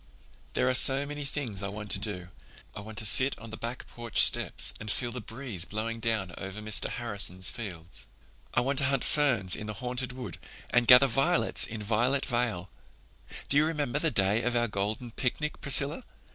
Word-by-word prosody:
"There - - +1
are 130 - +1
so 135 +2 +3
many 145 0 -7
things 135 -8 -3
I 100 - -3
want 105 +1 -6
to 100 - +1
do. 100 -4 -4 0.5
I - - -7
want 105 +1 -11
to 110 - -2
sit 130 +6 +8
on 115 0 -12
the - - -7
back 120 +3 -7
porch 120 -2 0
steps - - +2
and 110 - -7
feel 120 +3 0
the 125 0 -6
breeze 115 -5 -3
blowing 110 +3 -4
down 110 -6 -2
over 95 +1 -8
Mr. 105 0 0
Harrison's 100 -5 -1
fields. 90 -7 -5 0.4
I - - +1
want 135 +2 0
to 140 - +1
hunt 135 -1 0
ferns 125 -11 +1
in 105 - -8
the 110 - -6
Haunted 125 +3 -4
Wood 125 -1 -9 0.3
and 120 -1 +2
gather 125 +2 +8
violets 135 +7 +1
in 110 -2 -7
Violet 120 +6 0
Vale. 120 -7 -2 0.8
Do 140 - +4
you 155 - +4
remember 150 -4 -2
the 160 - +5
day 100 -2 +1
of 125 0 -2
our 120 0 +1
golden 105 +4 -4
picnic, 145 +6 -4
Priscilla? 140 - +4
120 Hz, 195 wpm, -28 LUFS, 105-135 Hz, 0.8 s, sit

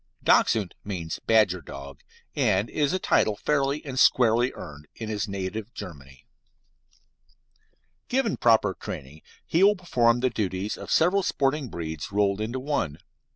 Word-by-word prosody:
Dachshund 105 -5 +3
means 90 -5 -5
"badger 105 -5 +3
dog," 70 -1 -10 0.4
and 100 +4 +1
it - - -18
is 145 -2 +1
a 185 - +1
title 110 - +2
fairly 140 +4 0
and 130 -2 -3
squarely 120 +1 +4
earned 75 0 -10
in 110 -1 -6
his 105 0 -2
native 100 +3 -5
Germany. 70 -6 -10 1.8
Given 250 -4 0
proper 110 -5 +3
training, 75 -2 -8 0.2
he 170 +4 +2
will 205 +1 +6
perform 120 - +2
the 130 -1 +1
duties 100 -2 -2
of - - -10
several 180 +5 +3
sporting 140 -4 0
breeds 80 -2 -6
rolled 100 0 +1
into 120 +4 -3
one. 130 - -2
110 Hz, 145 wpm, -26 LUFS, 90-135 Hz, 1.8 s, will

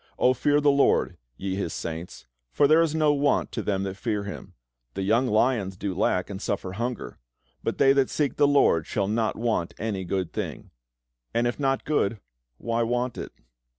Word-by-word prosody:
O 130 - +4
fear 145 +3 +2
the 145 -1 +4
LORD, 140 0 +2 0.2
ye 95 -1 -3
His 95 -4 -3
saints: 85 +1 -6 0.3
for 140 - +4
there 155 +3 +6
is 160 -2 +1
no 155 -2 +3
want 145 0 +1
to - - -3
them 100 -2 -1
that 95 0 -4
fear 105 -3 -2
Him. 100 - -8 0.4
The 95 - -2
young 115 +6 +2
lions 105 -4 +1
do 100 -1 -3
lack, 90 -1 +1
and 100 -1 -7
suffer 95 -3 -2
hunger: 120 +5 -4 0.4
but - - -2
they 135 - +5
that 135 -2 +2
seek 145 -3 -1
the 145 - +5
LORD 140 - +3
shall 100 -2 -1
not 110 +1 0
want 110 -7 -1
any 100 -3 -3
good 95 -1 -2
thing" - - -5 0.6
and 120 +1 +2
if 120 +3 -1
not 135 -1 0
good, 115 -8 0 0.4
why 115 - -1
want 120 +1 -1
it? - - -6
115 Hz, 190 wpm, -26 LUFS, 95-135 Hz, 0.6 s, there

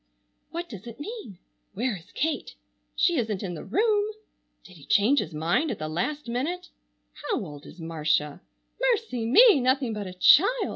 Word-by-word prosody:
What 345 +1 -5
does 210 - -10
it 235 0 -10
mean? 410 - -7 0.4
Where 240 +1 -1
is 170 -3 -13
Kate? 315 +1 -2 0.4
She 345 -3 +2
isn't 220 -5 -2
in 180 -3 -4
the 165 - -7
room! 420 - +1 0.5
Did 185 - -15
he 145 - -15
change 240 +8 +4
his 160 - -3
mind 170 - 0
at - - -3
the 155 - -4
last 245 - -3
minute? 330 +10 -3 0.4
How 295 - -3
old 145 -3 -10
is 180 - -13
Marcia? 155 -1 -1 0.4
Mercy 455 - 0
me! 425 - +7
Nothing 255 -1 +1
but 210 -2 -5
a 185 - -7
child! 390 - +5
240 Hz, 175 wpm, -26 LUFS, -, 0.5 s, me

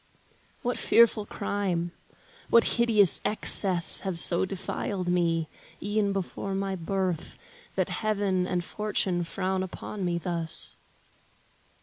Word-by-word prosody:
What 245 0 -2
fearful 225 -2 +3
crime, 185 -4 -3 0.6
what 235 - +5 0.2
hideous 215 -6 +3
excess 190 -4 +5
Have 190 -3 -4
so 170 +2 +6
defiled 190 -1 -4
me, 165 -2 0 0.3
e'en 205 0 -1
before 195 0 -4
my 195 0 -2
birth, 185 -1 -3 0.4
That - - -1
heaven 200 -4 -1
and 180 -1 -2
fortune 190 -3 -2
frown 185 +2 -3
upon 190 +2 -6
me 175 -1 -1
thus? 170 -2 -4
190 Hz, 110 wpm, -27 LUFS, 175-205 Hz, 0.6 s, so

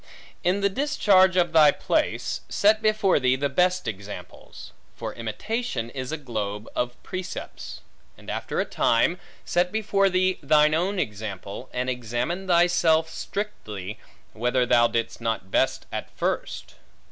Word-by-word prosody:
In 185 +3 +1
the 200 - +4
discharge 195 -7 +3
of 175 -2 +2
thy 155 -2 +8
place, - - -1
set 215 +2 +3
before 215 -5 +3
thee 130 -1 +3
the 140 +2 -1
best 180 +4 +1
examples; 100 -1 -8 0.2
for - - -5
imitation 120 - -3
is 130 0 -5
a 160 - -2
globe 110 -6 -4
of 120 0 -2
precepts. 185 -1 -6 0.4
And - - -17
after - - -3
a - - +1
time, 170 +10 +2 0.3
set 180 +1 +1
before 200 -2 +2
thee 185 0 +1
thine 150 +1 +4
own 185 +5 0
example; 105 - -5
and 125 +1 -2
examine 125 - -2
thyself 170 -2 +3
strictly, 110 - -5 0.3
whether 125 +2 +1
thou 120 -1 +5
didst 115 0 -3
not 110 -5 -2
best - - +1
at - - -4
first. - - -3
155 Hz, 140 wpm, -25 LUFS, 115-185 Hz, 0.4 s, thy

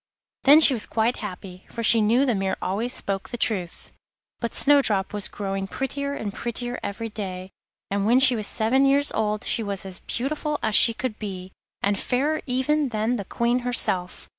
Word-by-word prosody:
Then 290 +3 +8
she 290 - +8
was 230 - 0
quite 230 +2 0
happy, 185 -3 -8
for 230 - -6
she 225 0 +5
knew 235 +6 +3
the 250 - +1
mirror 195 -2 -2
always 220 +6 -2
spoke 195 -5 -3
the 240 - -5
truth. 190 -7 -3 0.5
But 235 - -4
Snowdrop 230 -10 +3
was 205 -2 -2
growing 195 -1 -4
prettier 280 +5 -4
and 205 -7 -5
prettier 240 +1 -4
every 225 +3 -5
day, 190 -3 -6 0.4
and 200 0 0
when 245 +3 +5
she 265 -2 +5
was 215 -2 -1
seven 260 +5 +2
years 285 +1 +3
old 215 -1 -1
she 235 - -1
was 200 -3 -4
as 190 -1 -7
beautiful 295 +4 -3
as 220 - 0
she 230 +2 +6
could 250 -3 -4
be, 190 -3 -7 0.3
and 200 0 +1
fairer 290 +5 -1
even 270 +3 0
than 225 +2 -1
the 200 - -6
Queen 235 +4 0
herself. 230 -7 0
225 Hz, 190 wpm, -24 LUFS, 200-255 Hz, 0.5 s, Then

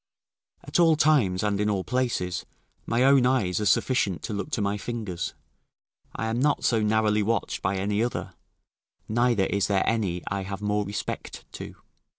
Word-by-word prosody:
At - - -1
all 165 -2 +6
times, 135 -13 +3
and 105 -1 0
in 105 - +1
all 100 -2 0
places, 120 -8 -1 0.4
my 120 +2 +2
own 135 -2 +5
eyes 105 -8 +1
are 105 - +1
sufficient 100 - +1
to - - -4
look 100 +8 -3
to - - 0
my 100 0 0
fingers; 105 -5 -4 0.8
I 110 - -2
am 110 +1 -1
not 145 +2 +1
so 115 -2 +2
narrowly 105 0 +2
watched 115 +3 -1
by 95 +1 0
any 100 +2 0
other, 120 - -3 0.7
neither 120 -3 +2
is 100 0 0
there 100 -2 +1
any 95 -7 0
I 100 0 -2
have 95 0 -5
more 105 0 0
respect 105 - -5
to. - - -8
105 Hz, 170 wpm, -26 LUFS, 100-120 Hz, 0.8 s, all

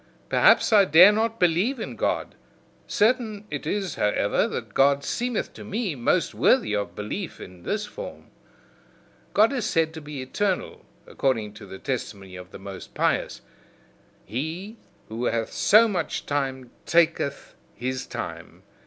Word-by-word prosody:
Perhaps - - +5
I 205 -2 +7
dare 180 +4 +8
not 225 +2 -1
believe 180 +10 +2
in - - -5
God: - - -1 0.5
certain 215 -2 +1
it - - -4
is 195 -5 -1
however, 105 0 +1
that - - -6
God 140 +1 +3
seemeth 245 +4 -2
to - - -10
me 210 -3 -2
most 120 -4 +1
worthy 105 - +3
of 100 -1 -3
belief 155 - -5
in 90 -1 -11
this 210 - -2
form. - - -9 1.0
God 220 +6 +5
is 250 -5 -1
said 160 -3 +1
to 160 - -8
be 145 -1 -7
eternal, 190 +8 -2 0.2
according 115 -6 -1
to 105 -1 -12
the 95 0 -9
testimony 100 -6 -5
of 90 0 -10
the - - -10
most 95 -1 -10
pious: - - 0 0.8
he 160 - -5 0.3
who 115 +3 -4
hath 115 -2 -1
so 225 +2 +6
much 205 -4 -2
time 135 -3 -2 0.2
taketh 165 -4 +1 0.2
his 130 +3 -3
time. - - -7
160 Hz, 145 wpm, -25 LUFS, -, 1.0 s, dare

